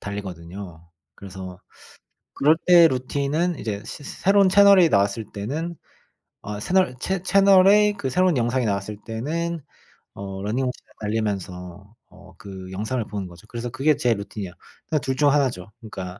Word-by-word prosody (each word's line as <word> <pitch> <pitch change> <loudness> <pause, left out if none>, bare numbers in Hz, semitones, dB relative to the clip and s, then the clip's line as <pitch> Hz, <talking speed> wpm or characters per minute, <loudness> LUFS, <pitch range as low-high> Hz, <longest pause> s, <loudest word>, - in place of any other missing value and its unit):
달리거든요. 90 -3 -8 0.3
그래서 95 -2 -9 0.7
그럴 155 +3 +4
때 170 -2 +8
루틴은 140 +6 -1
이제 105 -3 -4
새 - - -8
새로운 195 +4 +3
채널이 195 -2 +6
나왔을 100 +2 +1
때는 150 +12 -4 0.7
어 105 0 -6
채널- 180 - +1
채 190 +3 -2
채널에 195 +2 +5
그 140 -10 -4
새로운 180 +1 +2
영상이 120 +1 0
나왔을 100 0 -2
때는 160 +9 -3 0.5
어 95 -1 -7
러닝머신을 125 +5 -1 0.3
달리면서 100 -3 -4 0.2
어 105 - -16
그 95 -3 -10
영상을 110 +6 -2
보는 100 -3 -5
거죠. 85 -1 -15
그래서 120 0 -5
그게 135 +4 +2
제 125 -5 +2
루틴이야. 100 -2 -6 0.4
그러니까 155 -2 0
2 130 +1 -2
중 145 +1 +3
1 140 -2 +3
죠. 90 -2 -10
그러니까 95 -4 -8
115 Hz, 320 characters per minute, -23 LUFS, 100-160 Hz, 0.7 s, 때